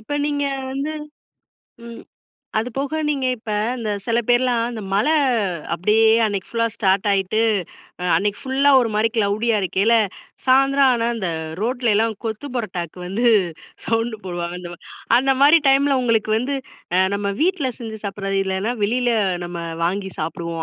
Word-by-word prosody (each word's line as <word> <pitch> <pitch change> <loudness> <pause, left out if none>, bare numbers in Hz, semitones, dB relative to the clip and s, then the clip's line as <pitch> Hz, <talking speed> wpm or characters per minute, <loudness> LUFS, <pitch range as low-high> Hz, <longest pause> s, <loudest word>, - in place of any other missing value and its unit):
இப்ப 220 +6 -8
நீங்க 285 -1 -1 0.3
வந்து 280 +3 -3 0.9
ம். 235 0 -10 0.6
அதுபோக 270 +7 -2
நீங்க 275 -3 0
இப்ப 220 -1 -9 0.3
இந்த 220 -2 -3 0.2
சில 230 0 +1
பேர்லாம் 245 -1 +3
அந்த 225 -2 -6
மழ 205 +7 +2 0.7
அப்பிடியே 215 +5 +3 0.2
அன்னக்கி 200 -3 -2
ஃபுல்லா 230 -1 0
ஸ்டார்ட் 195 0 +1
ஆயிட்டு, 195 +3 0 0.6
அ 180 - -4
அன்னக்கி 205 0 -1
ஃபுல்ல 270 +2 +2
ஒருமாரிக்கு 225 0 0
க்ளோடியா 215 +2 +1
இருக்கயில, 200 +5 +2 0.5
சாயந்தரம் 270 +1 +4
ஆனா, 230 0 0
அந்த 190 -5 -2 0.3
ரோட்லயெல்லாம் 225 -2 +1
கொத்து 225 +6 -4
பரோட்டாக்கு 180 -6 -4
வந்து 210 +7 -2 0.6
சவுண்டு 225 -1 -1
போடுவாங்க 175 -1 -4
அந்தமாரி 175 -1 -9 0.4
அந்தமாரி 275 +5 +5
டைம்ல 275 0 +4
உங்களுக்கு 225 -2 +1
வந்து 275 +4 -2 0.4
அ - - +5
நம்ம 200 0 -1
வீட்ல 325 -6 +1
செஞ்சு 220 -2 -7
சாப்பிட்றது 195 -1 -2
இல்லன்னா, 190 +5 -1
வெளியில 245 +3 +1 0.4
நம்ம 175 0 -6 0.3
வாங்கி 190 +2 -2
சாப்பிடுவோம். 165 +1 -4
225 Hz, 135 wpm, -21 LUFS, 200-255 Hz, 0.9 s, அந்தமாரி